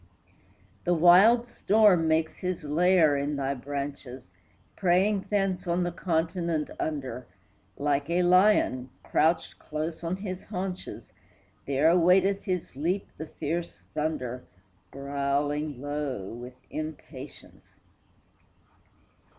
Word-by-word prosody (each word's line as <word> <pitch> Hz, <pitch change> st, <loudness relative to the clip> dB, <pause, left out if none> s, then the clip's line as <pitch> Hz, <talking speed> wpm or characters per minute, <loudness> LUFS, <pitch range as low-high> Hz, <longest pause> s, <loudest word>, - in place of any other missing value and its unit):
The 175 Hz, 0 st, +2 dB
wild 195 Hz, +9 st, +6 dB
storm 210 Hz, -7 st, +3 dB
makes 160 Hz, 0 st, +1 dB
his 180 Hz, -2 st, -3 dB
lair 160 Hz, 0 st, +4 dB
in 140 Hz, +1 st, -1 dB
thy 140 Hz, 0 st, -1 dB
branches, 140 Hz, -1 st, -6 dB, 0.5 s
Preying 195 Hz, +2 st, +2 dB
thence 195 Hz, -3 st, 0 dB
on 175 Hz, +1 st, +1 dB
the 175 Hz, -, -1 dB
continent 165 Hz, -2 st, -1 dB
under; 130 Hz, -5 st, -4 dB, 0.5 s
Like 145 Hz, 0 st, 0 dB
a 175 Hz, +1 st, +2 dB
lion, 180 Hz, -8 st, +3 dB
crouched 160 Hz, +2 st, +1 dB
close 155 Hz, +2 st, -5 dB
on 170 Hz, +2 st, -1 dB
his 185 Hz, -1 st, -6 dB
haunches, 185 Hz, -2 st, -5 dB, 0.6 s
There 140 Hz, +3 st, +2 dB
awaiteth 180 Hz, +3 st, +4 dB
his 180 Hz, -8 st, -3 dB
leap 175 Hz, +8 st, -1 dB
the 155 Hz, -, -5 dB
fierce 165 Hz, +3 st, -4 dB
thunder, 130 Hz, -5 st, -3 dB, 0.5 s
Growling 140 Hz, +1 st, -2 dB
low 145 Hz, -8 st, -4 dB
with 125 Hz, +2 st, -9 dB, 0.2 s
impatience. 155 Hz, 0 st, -9 dB
160 Hz, 105 wpm, -27 LUFS, 145-180 Hz, 0.6 s, wild